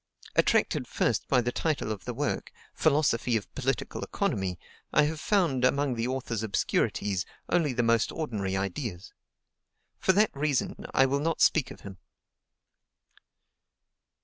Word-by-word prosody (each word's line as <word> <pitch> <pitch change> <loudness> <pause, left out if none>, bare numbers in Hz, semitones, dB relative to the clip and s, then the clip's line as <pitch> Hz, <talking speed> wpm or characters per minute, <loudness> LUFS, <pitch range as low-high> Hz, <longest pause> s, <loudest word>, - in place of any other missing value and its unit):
Attracted - - +2
first - - 0
by 125 - +3
the 120 +1 -1
title 145 -6 -1
of 105 -3 -6
the 125 - -3
work, 145 +2 -2 0.2
"Philosophy 140 -6 +2
of 105 - -8
Political - - -2
Economy," 95 -2 -1 0.3
I 150 - +5
have 155 +1 -1
found, 165 -10 +1
among 140 +1 +2
the 115 0 -1
author's 125 -4 -2
obscurities, 100 -2 0 0.3
only 170 -5 +2
the 120 -1 0
most 115 -1 +2
ordinary 105 -11 -2
ideas. 95 0 -4 0.9
For - - +4
that 210 -2 +3
reason 140 -2 -1
I 135 - +5
will 140 +1 +1
not 165 +2 -1
speak 145 -5 +4
of - - -11
him. 95 -2 -10
125 Hz, 140 wpm, -28 LUFS, 110-150 Hz, 0.9 s, I